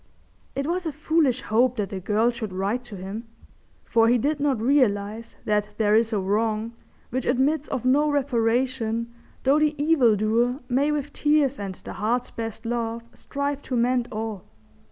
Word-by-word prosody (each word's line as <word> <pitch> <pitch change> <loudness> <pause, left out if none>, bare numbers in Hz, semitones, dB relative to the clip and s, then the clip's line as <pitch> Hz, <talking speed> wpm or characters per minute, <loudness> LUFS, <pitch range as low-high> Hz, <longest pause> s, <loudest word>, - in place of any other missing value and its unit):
It 275 +1 -1
was 350 +2 -1
a - - -1
foolish 300 -3 +1
hope 240 +3 +2
that 205 -4 -2
the 195 - -4
girl 215 +5 +2
should 230 -4 -5
write 200 +7 -1
to 220 - -9
him, 200 +5 -6 0.6
for 225 -1 +3
he 245 +2 +4
did 290 +5 0
not 280 -5 +1
realise 225 -3 +1
that 210 0 0
there 210 -1 +2
is 225 +1 +3
a 210 - +1
wrong 215 +3 0 0.4
which 255 +1 -2
admits 280 +4 +1
of 255 - -3
no 290 +4 +4
reparation 235 -3 0 0.3
though 275 +3 +4
the 305 0 +2
evildoer 245 -4 +3
may 275 +4 +2
with 290 -1 -3
tears 295 -2 +2
and 195 -2 -4
the - - -9
heart's 240 +5 -1
best 225 0 -6
love 230 0 -2
strive 280 0 -3
to 260 - -4
mend 245 0 +2
all. 215 -3 -4
240 Hz, 170 wpm, -25 LUFS, 220-275 Hz, 0.6 s, he